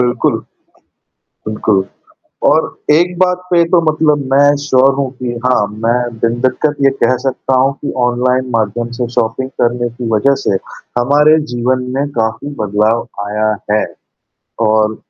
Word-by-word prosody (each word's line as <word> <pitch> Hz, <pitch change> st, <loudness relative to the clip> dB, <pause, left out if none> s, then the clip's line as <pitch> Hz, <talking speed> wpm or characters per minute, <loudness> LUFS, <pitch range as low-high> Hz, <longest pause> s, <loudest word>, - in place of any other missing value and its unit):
बिल्कुल। 125 Hz, 0 st, +1 dB, 1.1 s
बिल्कुल 105 Hz, -2 st, +1 dB, 0.6 s
और -, -, +4 dB, 0.3 s
एक 175 Hz, +3 st, +2 dB
बात 180 Hz, -1 st, +3 dB
पे 170 Hz, -1 st, +5 dB
तो 175 Hz, -, +4 dB
मतलब 155 Hz, -2 st, +1 dB
मैं 145 Hz, +1 st, +5 dB
श्योर 135 Hz, -1 st, +4 dB
हूँ 140 Hz, -1 st, -1 dB
कि 125 Hz, -1 st, -3 dB
हाँ, 125 Hz, -5 st, +3 dB
मैं 115 Hz, +2 st, -2 dB
बिन 115 Hz, +1 st, 0 dB
दिक्कत 145 Hz, +3 st, +1 dB
ये -, -, +7 dB
कह 130 Hz, -, +3 dB
सकता 135 Hz, 0 st, -1 dB
हूँ 135 Hz, +1 st, +2 dB
कि -, -, -2 dB, 0.2 s
ऑनलाइन 125 Hz, +1 st, 0 dB
माध्यम 115 Hz, +2 st, -1 dB
से 125 Hz, -2 st, -1 dB
शॉपिंग 120 Hz, +4 st, -1 dB
करने 120 Hz, 0 st, +1 dB
की 120 Hz, 0 st, -6 dB
वजह 135 Hz, +6 st, +3 dB
से, 100 Hz, -, 0 dB, 0.4 s
हमारे 150 Hz, +5 st, +4 dB
जीवन 125 Hz, +1 st, 0 dB
में 140 Hz, +1 st, 0 dB
काफ़ी 110 Hz, +5 st, -2 dB
बदलाव 105 Hz, +3 st, +1 dB, 0.2 s
आया 105 Hz, +1 st, -1 dB, 0.2 s
है। 105 Hz, 0 st, +2 dB, 0.8 s
और 110 Hz, 0 st, +2 dB
125 Hz, 145 wpm, -15 LUFS, 115-140 Hz, 1.1 s, ये